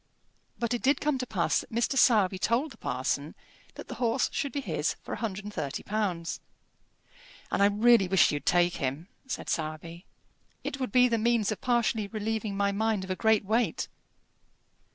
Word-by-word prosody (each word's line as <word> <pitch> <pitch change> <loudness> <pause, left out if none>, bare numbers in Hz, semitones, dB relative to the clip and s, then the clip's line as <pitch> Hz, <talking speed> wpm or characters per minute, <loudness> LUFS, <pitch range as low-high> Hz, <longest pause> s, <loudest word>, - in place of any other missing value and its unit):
But 235 0 -1
it 240 - -2
did 275 +2 +3
come 295 -3 0
to 255 - -3
pass 180 -6 +1
that - - -9
Mr. 235 +4 0
Sowerby 205 -7 +4
told 245 +9 +1
the - - -13
parson 135 +4 -2 0.4
that - - -9
the - - -6
horse 240 +2 +1
should 285 -3 -2
be 285 - -2
his 275 - -1
for - - -5
£130. 195 - -3 1.1
"And - - +1
I - - +7
really 210 0 +4
wish 190 -1 +4
you'd 145 -1 -4
take 175 0 +3
him," 140 +7 -3 0.2
said 255 - -5
Sowerby. 165 +2 -4 0.6
"It 280 - -4
would 255 -5 -2
be 250 +2 +5
the 230 -2 0
means 225 -2 +2
of 215 - -4
partially 235 -4 +1
relieving 215 -1 -3
my 200 0 +2
mind 215 -1 0
of 190 - -5
a - - 0
great 220 0 +2
weight." 225 +4 0
215 Hz, 175 wpm, -28 LUFS, 185-235 Hz, 1.1 s, I